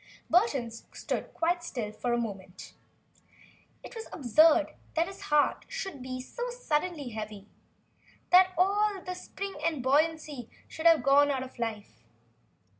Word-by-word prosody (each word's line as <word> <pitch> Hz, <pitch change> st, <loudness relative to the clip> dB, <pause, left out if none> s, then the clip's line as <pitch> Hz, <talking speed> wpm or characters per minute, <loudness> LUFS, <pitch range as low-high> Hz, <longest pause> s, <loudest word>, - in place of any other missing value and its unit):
Burton 285 Hz, -, +2 dB
stood 230 Hz, -, -5 dB
quite 345 Hz, +1 st, 0 dB
still 230 Hz, -10 st, -4 dB
for 240 Hz, +3 st, -3 dB
a 240 Hz, -, +2 dB
moment. 195 Hz, -5 st, -6 dB, 1.1 s
It -, -, -10 dB
was 450 Hz, -2 st, -8 dB
absurd 310 Hz, +3 st, +4 dB, 0.2 s
that 330 Hz, +1 st, +3 dB
his 390 Hz, +1 st, -10 dB
heart 295 Hz, -1 st, +2 dB
should 380 Hz, -9 st, -5 dB
be 255 Hz, 0 st, -5 dB
so 485 Hz, -, -5 dB
suddenly 340 Hz, -, -2 dB
heavy, 215 Hz, -3 st, -7 dB, 0.9 s
that 370 Hz, +1 st, +7 dB
all 400 Hz, +2 st, +2 dB
the 365 Hz, -, -3 dB
spring 390 Hz, +2 st, -6 dB
and 315 Hz, -6 st, 0 dB
buoyancy 295 Hz, -2 st, +1 dB, 0.2 s
should 320 Hz, +1 st, 0 dB
have 330 Hz, -2 st, +6 dB
gone 285 Hz, +1 st, +5 dB
out 265 Hz, -2 st, -1 dB
of 255 Hz, -1 st, -12 dB
life! 220 Hz, -3 st, -5 dB
295 Hz, 140 wpm, -29 LUFS, 245-360 Hz, 1.1 s, that